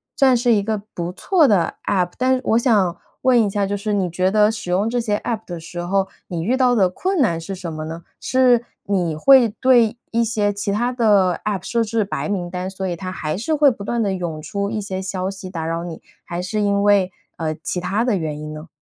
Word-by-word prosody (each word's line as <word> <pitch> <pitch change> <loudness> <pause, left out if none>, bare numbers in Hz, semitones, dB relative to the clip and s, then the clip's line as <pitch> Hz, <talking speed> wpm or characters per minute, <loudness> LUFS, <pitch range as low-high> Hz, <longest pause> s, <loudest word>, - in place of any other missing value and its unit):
算 260 -3 +4
是 240 0 +3
一 205 - +3
个 215 +1 -2
不 175 0 -3
错 325 - +3
的 190 -7 +2
App。 180 -3 +1
但 260 +1 +3
是 255 - -3
我 225 - +3
想 205 -8 +2 0.3
问 255 -2 +4
一 205 - 0
下， 200 0 0
就 200 +1 -2
是 210 +1 -2
你 190 -3 +1
觉 185 +2 +1
得 210 +1 +4
使 220 -5 -7
用 195 +5 +1
这 245 +1 0
些 215 -3 0
App 220 +1 -3
的 175 -2 -6
时 170 +2 -8
候， 190 +2 0 0.2
你 165 -2 -3
遇 245 +7 +1
到 255 -2 +3
的 195 -5 +4
困 370 - -2
难 170 -11 +2
是 195 +4 -5
什 175 -3 -6
么 155 0 -5
呢？ 165 +1 -7 0.2
是 250 -2 +3 0.2
你 180 -5 0
会 250 - +6
对 235 0 +3
一 230 0 +2
些 210 -2 0
其 200 0 -2
他 240 +4 0
的 210 -7 +3
App 195 -3 -2
设 235 -1 +1
置 220 0 0
白 200 - -4
名 180 -4 -2
单， 180 +1 -3
所 190 0 -4
以 175 - -2
它 185 +1 -6
还 155 -4 -3
是 305 +11 -1
会 290 -2 +5
不 205 -3 -8
断 235 +3 -1
地 200 -2 0
涌 170 -4 -4
出 200 +6 -3
一 220 - -2
些 190 -2 -4
消 190 -1 -3
息 190 -1 -8
打 165 -3 -4
扰 165 +1 -2
你， 170 -2 -8 0.2
还 175 - -5
是 185 +4 -2
因 200 0 +1
为， 200 -3 +4 0.3
呃， 155 -1 -2
其 180 - -2
他 195 +5 0
的 240 - +2
原 155 -4 -3
因 155 0 -6
呢？ 155 +2 -9
200 Hz, 280 characters per minute, -21 LUFS, 180-230 Hz, 0.3 s, 会